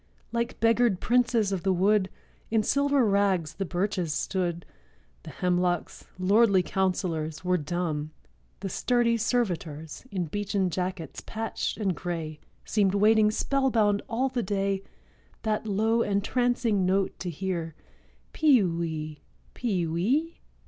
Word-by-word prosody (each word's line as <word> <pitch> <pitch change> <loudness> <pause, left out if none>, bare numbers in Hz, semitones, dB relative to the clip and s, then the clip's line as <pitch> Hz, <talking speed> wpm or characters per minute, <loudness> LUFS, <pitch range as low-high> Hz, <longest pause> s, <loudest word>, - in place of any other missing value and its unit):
Like 235 +1 -2
beggared 230 -3 +3
princes 235 -4 +2
of 190 -3 -1
the 195 - +1
wood, 190 +1 +3 0.4
In 220 -1 +2
silver 280 +1 +2
rags 195 -6 +1
the 195 - -3
birches 180 -2 -1
stood; 175 +1 -2 0.6
The - - -10
hemlocks, 180 -1 -1
lordly 200 +1 +4
counselors, 180 -4 -1
Were 180 0 +2
dumb; 155 -1 -2 0.5
the - - -3
sturdy 235 +4 +1
servitors, 180 - -2
In 185 -6 -2
beechen 195 +1 -1
jackets 180 -1 -4
patched 225 0 -3
and 195 -5 0
gray, 165 -4 -4 0.3
Seemed 200 -2 +2
waiting 215 +1 +5
spellbound 225 -4 +1
all 250 +3 +1
the 250 -2 -1
day 195 -1 -1 0.6
That 220 0 -1
low, 220 +3 +2
entrancing 225 +1 +1
note 190 +1 0
to 180 - -4
hear— 170 -2 -3 0.6
'Pe 285 -8 +5
wee! 160 -3 -3 0.3
pe 195 -8 -1
wee! 240 - 0
195 Hz, 125 wpm, -27 LUFS, 175-225 Hz, 0.6 s, waiting